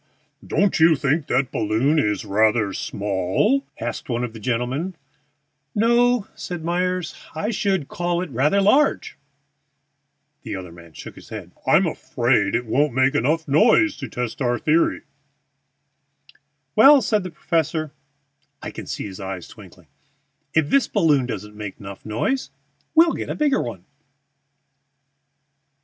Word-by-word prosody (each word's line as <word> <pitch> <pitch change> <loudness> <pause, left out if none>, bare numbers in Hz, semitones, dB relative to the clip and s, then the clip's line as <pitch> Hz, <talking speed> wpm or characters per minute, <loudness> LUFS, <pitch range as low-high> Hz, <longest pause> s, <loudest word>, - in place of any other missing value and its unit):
"Don't 200 -4 +1
you 160 0 +6
think 140 +2 0
that 135 -2 0
balloon 115 +9 +1
is 105 -5 -1
rather 105 0 +2
small?" 100 - 0 0.2
asked 120 +3 -5
one 120 0 -1
of 120 -2 -4
the 110 - -9
gentlemen. 125 - -2 0.8
"No," 240 0 +3
said 175 -3 -6
Myers; 180 0 -1 0.2
"I 205 +8 -2
should 195 -8 0
call 175 0 -2
it 170 - -8
rather 145 +10 +2
large." 270 +9 +2 1.3
The - - -5
other 90 -2 -7
man 85 -1 -15
shook - - -10
his - - -15
head. - - -8 0.2
"I'm - - +5
afraid - - 0
it 120 - -1
won't 135 +4 +1
make 130 +1 +3
noise 145 - +2 0.3
enough 235 - +4
to - - -5
test 125 +1 -4
our 120 -1 +1
theory." 160 +5 +1 1.7
"Well," 280 -2 +7
said 210 0 +1
the 185 - -6
professor 160 -2 -1 0.7
(I - - -7
can - - -9
see - - -4
his 95 -2 -8
eyes 95 -2 -6
twinkling), - - -15 0.7
"if 160 -2 +2
this 275 -5 +4
balloon 150 - +2
doesn't 105 -3 -6
make 105 -2 -7
noise 100 -1 -9
enough 115 - -2 0.5
we'll 330 +1 +6
get - - -5
a - - -2
bigger 295 -3 +2
one." 100 -7 -6
145 Hz, 140 wpm, -22 LUFS, -, 1.7 s, Well